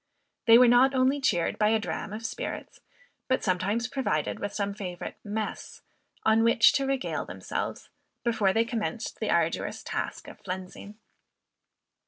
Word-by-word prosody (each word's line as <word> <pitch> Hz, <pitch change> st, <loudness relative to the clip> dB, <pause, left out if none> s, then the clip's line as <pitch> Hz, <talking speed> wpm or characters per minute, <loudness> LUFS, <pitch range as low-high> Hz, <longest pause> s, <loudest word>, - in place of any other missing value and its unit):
They 230 Hz, 0 st, +9 dB
were 250 Hz, 0 st, +7 dB
not 255 Hz, +3 st, +5 dB
only 260 Hz, +2 st, +2 dB
cheered 175 Hz, -11 st, +1 dB
by 210 Hz, -1 st, +4 dB
a 225 Hz, -, +4 dB
dram 210 Hz, -1 st, -4 dB
of 220 Hz, +2 st, -6 dB
spirits, -, -, -5 dB, 0.5 s
but 260 Hz, -, +1 dB
sometimes 200 Hz, +5 st, 0 dB
provided 265 Hz, +1 st, -1 dB
with 205 Hz, -, -3 dB
some 200 Hz, -1 st, -2 dB
favorite 180 Hz, -4 st, -6 dB
"mess," 215 Hz, +1 st, -5 dB, 0.4 s
on 220 Hz, +1 st, +4 dB
which 230 Hz, -1 st, +6 dB
to 275 Hz, -1 st, +1 dB
regale 270 Hz, -1 st, -1 dB
themselves, -, -, -5 dB, 0.4 s
before 220 Hz, -5 st, +2 dB
they 225 Hz, +4 st, +2 dB
commenced 230 Hz, 0 st, -4 dB
the -, -, -2 dB
arduous -, -, 0 dB
task -, -, -4 dB
of -, -, -12 dB
flensing. 190 Hz, +2 st, -7 dB
225 Hz, 150 wpm, -28 LUFS, 205-250 Hz, 0.5 s, They